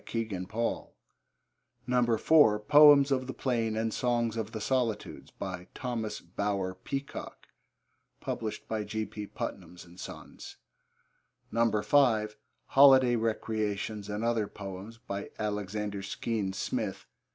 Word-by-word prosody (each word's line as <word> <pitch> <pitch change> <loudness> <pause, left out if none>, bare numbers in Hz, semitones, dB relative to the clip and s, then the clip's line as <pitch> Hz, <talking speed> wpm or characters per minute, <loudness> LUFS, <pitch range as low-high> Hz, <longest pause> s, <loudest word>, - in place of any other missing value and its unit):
(Kegan 105 -6 -3
Paul.) 115 +2 -3 0.9
(4) 125 0 +4
Poems 145 +3 +7
of 130 -1 0
the 130 - -5
Plain 115 -4 -1
and 110 0 -1
Songs 120 -2 0
of 110 -1 -3
the 110 - -5
Solitudes. 115 -2 -2
By 90 - -6
Thomas 115 -4 -3
Bower 95 +1 -2
Peacock. 135 +9 -6 1.4
(G. 110 +2 -3
P. 105 -1 -7
Putnam's 90 -2 -7 0.2
Sons.) - - -10 1.0
(5) 110 0 +2 0.3
Holiday 130 -3 +6
Recreations 110 -2 -2
and 105 +2 -3
Other 115 -3 +1
Poems. 100 +3 -8
By 100 -3 -6
Alexander 105 -1 -3
Skene 100 0 -3
Smith. - - -3
110 Hz, 105 wpm, -30 LUFS, 105-120 Hz, 1.4 s, Poems